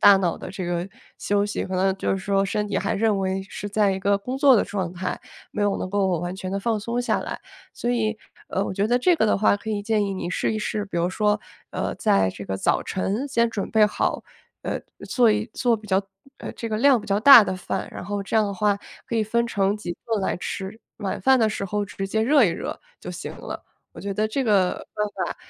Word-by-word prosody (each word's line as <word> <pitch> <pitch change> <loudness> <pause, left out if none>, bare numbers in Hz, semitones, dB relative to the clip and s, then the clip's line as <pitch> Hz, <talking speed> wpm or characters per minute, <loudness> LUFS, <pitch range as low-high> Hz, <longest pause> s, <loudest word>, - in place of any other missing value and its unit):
大 200 - +8
脑 180 -3 0
的 - - -7
这 190 -1 -5
个 175 +1 -2 0.3
休 205 0 +1
息， 205 - -3
可 190 - -5
能 190 +1 +2
就 - - -1
是 195 - -1
说 195 0 +1
身 210 +1 -1
体 - - -1
还 - - -1
认 210 -1 +2
为 190 0 -1
是 205 +1 -7
在 205 0 +2
一 190 - -2
个 200 +1 +2
工 250 +7 -4
作 270 -3 +7
的 - - +2
状 190 -4 -3
态， 185 +1 -4 0.3
没 210 - -2
有 205 -1 +2
能 185 - -4
够 190 -4 +1
完 175 +1 -3
全 190 -1 -5
地 195 - -1
放 225 0 0
松 235 +3 -2
下 245 - 0
来， - - -5 0.3
所 240 - -2
以， 220 -3 0 0.3
呃， 195 - -1
我 - - -3
觉 200 +2 +1
得 245 +2 +3
这 355 +8 +4
个 220 - +2
的 - - +3
话 205 0 +3
可 220 - -10
以 205 -1 -2
建 215 -1 +1
议 195 -1 -2
你 175 -2 -4
试 - - 0
一 215 - -2
试， 210 0 -2
比 175 - -6
如 170 +1 +2
说， 210 +1 +1 0.3
呃， - - -2
在 95 -1 +3
这 100 - -9
个 95 0 -3
早 - - +1
晨 200 +8 -2
先 235 -3 +2
准 205 -3 -4
备 215 -1 +5
好， - - -1 0.4
呃， - - -3 0.3
做 240 -3 +4
一 215 +1 0
做 240 -2 +2
比 215 0 -13
较， 190 0 +1 0.3
呃， - - -6
这 230 - -5
个 215 - -1
量 260 +1 +5
比 - - -12
较 200 +1 +1
大 245 -4 +10
的 185 - -2
饭， 185 - -3
然 - - -7
后 205 0 -3
这 210 - -1
样 215 - +4
的 200 - -2
话 205 +1 +1 0.3
可 - - -4
以 220 - +3
分 235 +2 0
成 200 -2 +1
几 175 -5 -6
顿 225 -3 0
来 - - -1
吃， 195 +3 -5 0.2
晚 200 -3 -3
饭 265 0 +5
的 220 -2 +3
时 210 - -3
候 205 +2 -1
直 195 0 -5
接 220 +2 0
热 270 +2 +5
一 - - +4
热 170 - -4 0.2
就 - - -7
行 - - -6
了。 - - -7 0.3
我 - - -10
觉 200 0 -3
得 215 +2 +1
这 265 +5 -1
个 200 -6 +2
办 210 0 -1 0.2
法， - - -5
205 Hz, 275 characters per minute, -24 LUFS, 190-220 Hz, 0.4 s, 大